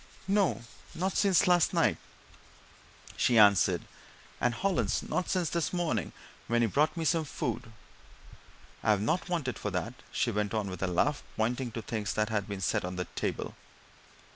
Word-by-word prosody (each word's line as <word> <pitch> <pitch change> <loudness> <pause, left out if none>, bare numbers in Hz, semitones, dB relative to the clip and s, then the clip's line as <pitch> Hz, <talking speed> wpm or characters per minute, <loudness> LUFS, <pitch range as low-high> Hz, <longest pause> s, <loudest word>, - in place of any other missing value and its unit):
"No 195 - +2 0.3
not 190 +3 -1
since 195 -3 +4
last 175 -2 +3
night," - - +3 1.2
she 120 - +3
answered. 100 -3 +5 0.6
"And 120 - +1
Hollins 195 +4 0
not 180 - -2
since 180 -4 0
this 170 -2 0
morning 175 -2 -1 0.4
when 120 0 +2
he - - +3
brought 150 - +1
me 165 - -1
some 165 0 +2
food 120 -6 -4 1.1
I've 105 -2 +3
not 170 - 0
wanted 155 -8 -2
for 105 - -2
that," 100 +5 -3 0.2
she 120 - 0
went 105 0 -1
on, 105 -3 -1
with 90 - -7
a 95 - +1
laugh, 95 +12 +1 0.2
pointing 120 +3 0
to 115 - -5
things 105 -4 -3
that 105 0 +1
had 105 -3 -1
been 100 -2 -5
set - - 0
on 90 +1 -4
the 90 0 -2
table. - - -3
120 Hz, 165 wpm, -30 LUFS, 105-170 Hz, 1.2 s, answered